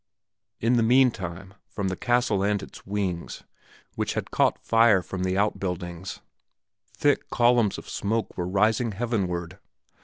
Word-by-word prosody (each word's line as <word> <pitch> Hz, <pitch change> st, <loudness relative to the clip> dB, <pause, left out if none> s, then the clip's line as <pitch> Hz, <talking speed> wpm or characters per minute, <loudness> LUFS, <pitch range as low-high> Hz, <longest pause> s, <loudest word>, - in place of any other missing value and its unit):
In 120 Hz, +2 st, +2 dB
the -, -, +3 dB
meantime, 100 Hz, -7 st, +1 dB
from 100 Hz, -2 st, -3 dB
the 95 Hz, -, -2 dB
castle 120 Hz, -2 st, +1 dB
and 100 Hz, +1 st, +1 dB
the -, -, -11 dB
wings, 95 Hz, -4 st, -3 dB, 0.5 s
which -, -, -2 dB
had -, -, -4 dB
caught -, -, +2 dB
fire 115 Hz, -5 st, +5 dB
from 90 Hz, +2 st, -5 dB
the 95 Hz, 0 st, 0 dB
out 105 Hz, +1 st, +1 dB
buildings, 90 Hz, -1 st, -5 dB, 0.8 s
thick 145 Hz, -1 st, +1 dB
columns 120 Hz, -4 st, +3 dB
of -, -, -10 dB
smoke 110 Hz, +2 st, -2 dB
were 90 Hz, -1 st, -3 dB
rising 110 Hz, +4 st, +1 dB
heavenward. 95 Hz, -5 st, -2 dB
100 Hz, 145 wpm, -26 LUFS, 95-115 Hz, 0.8 s, fire